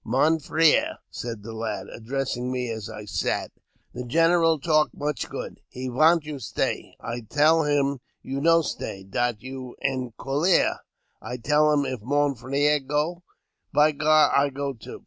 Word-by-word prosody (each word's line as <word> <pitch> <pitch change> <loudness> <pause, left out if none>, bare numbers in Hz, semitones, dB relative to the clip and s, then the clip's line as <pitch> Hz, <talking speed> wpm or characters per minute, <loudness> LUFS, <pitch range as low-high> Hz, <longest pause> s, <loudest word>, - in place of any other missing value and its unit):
'* - - -47
Mon 160 +3 +4
frere," 165 - +3
said 115 -4 -6
the 115 +1 -7
lad, 110 -4 -4
addressing 125 +1 -3
me 125 -2 -2
as 110 -1 -5
I 105 -1 -8
sat, - - -2 0.2
" - - -40
the 125 - -5
general 165 +4 +3
talk 155 +1 +3
much 150 0 -3
good. - - -6
He 130 0 -5
vant 155 +5 +4
you 150 -2 -6
stay. 115 - -3
I 115 +1 -5
tell 150 +8 +3
him 140 -2 +1 0.2
you 135 +1 -4
no 165 +1 +5
stay; 95 -8 -5
dat 115 +4 -2
you 130 -1 -7
en 130 -3 -2
colere. 150 +7 +2 0.4
I 125 +3 -5
tell 150 +5 +3
him 145 -1 +2
if 130 -4 -4
mon 145 +4 +1
frere 140 +4 +1
go, 150 +5 -2 0.5
by 150 +1 +4
gar, 155 +1 +4
I 140 +1 +4
go 140 0 -3
too. 115 - -10
140 Hz, 170 wpm, -25 LUFS, 125-155 Hz, 0.5 s, no